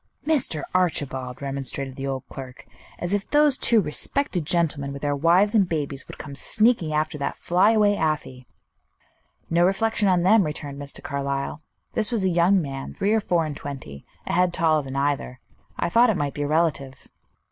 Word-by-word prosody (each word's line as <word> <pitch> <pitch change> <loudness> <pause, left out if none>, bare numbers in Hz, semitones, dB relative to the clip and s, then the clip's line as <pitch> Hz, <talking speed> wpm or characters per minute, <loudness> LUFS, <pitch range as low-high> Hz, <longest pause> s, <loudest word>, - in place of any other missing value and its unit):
"Mr. 270 - +1
Archibald!" 135 -8 -1
remonstrated 135 -1 -3
the 135 0 -5
old 135 -1 -3
clerk; 130 -1 -10 0.3
"as 175 +2 -3
if 205 -1 -1
those 295 -2 +4
two 235 -4 +3
respected 180 - -1
gentlemen, 155 -5 0
with 140 - -9
their 145 0 +1
wives 175 +8 +3
and 200 -5 +3
babies, 145 -4 -3
would - - -10
come 145 -1 -8
sneaking 215 - +2
after 150 0 -1
that 140 - -3
flyaway 205 +4 +3
Afy!" 150 -8 -2 1.0
"No 170 +1 +4
reflection 205 +3 +1
on 180 -2 +3
them," 210 +3 +5
returned 145 -3 -5
Mr. 140 0 -6
Carlyle. 140 +1 -3 0.3
"This 220 +1 -1
was 225 -5 0
a 190 - +2
young 175 +3 +4
man, 135 -1 -6
three 200 +2 +1
or 220 - +3
four 170 -4 +1
and 150 -2 -5
twenty, 130 - -8 0.2
a - - -3
head 180 0 +2
taller 155 -2 +2
than 135 -1 -7
either. 140 -2 -1 0.4
I - - 0
thought 230 +7 +4
it 210 - +1
might 145 -2 -2
be 145 - -5
a 145 - 0
relative." 145 -4 -1
155 Hz, 180 wpm, -24 LUFS, 140-190 Hz, 1.0 s, them